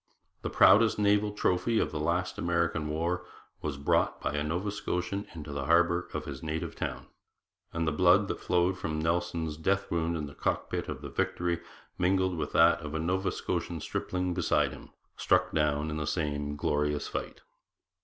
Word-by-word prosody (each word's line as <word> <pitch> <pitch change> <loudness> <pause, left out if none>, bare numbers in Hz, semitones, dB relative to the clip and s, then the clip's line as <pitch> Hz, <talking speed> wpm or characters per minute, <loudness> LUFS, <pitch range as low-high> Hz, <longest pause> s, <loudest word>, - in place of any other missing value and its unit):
The - - -3
proudest 110 +1 +6
naval 105 0 +3
trophy 105 +2 +1
of 75 - +1
the 75 - -3
last 85 +4 -1
American 85 -2 0
war 85 +4 -1 0.4
was 75 -3 -3
brought 70 - +1
by - - -2
a 75 - 0
Nova 90 +7 -2
Scotian 100 0 -3
into 75 -2 -7
the 70 -1 -3
harbour 85 +2 +3
of - - -3
his 70 -2 -6
native 80 0 -3
town; - - -4 0.7
and 80 -1 -1
the - - +2
blood 90 +5 +4
that - - -3
flowed 90 +1 +1
from 80 -1 -2
Nelson's 80 -1 -1
death 100 +5 0
wound 85 0 0
in 75 - -3
the 70 - -9
cockpit - - -2
of - - -6
the - - -5
Victory 85 -1 -1 0.4
mingled 95 0 +2
with 80 - -3
that 85 +1 +6
of 75 0 -6
a - - 0
Nova 95 +4 0
Scotian 85 -1 -3
stripling 90 +3 -2
beside - - +2
him, - - -11 0.3
struck 90 0 +2
down 75 0 +1
in 75 - -3
the 75 -2 -3
same 75 -3 -2
glorious 75 0 0
fight.' - - -5
85 Hz, 180 wpm, -29 LUFS, 75-90 Hz, 0.7 s, proudest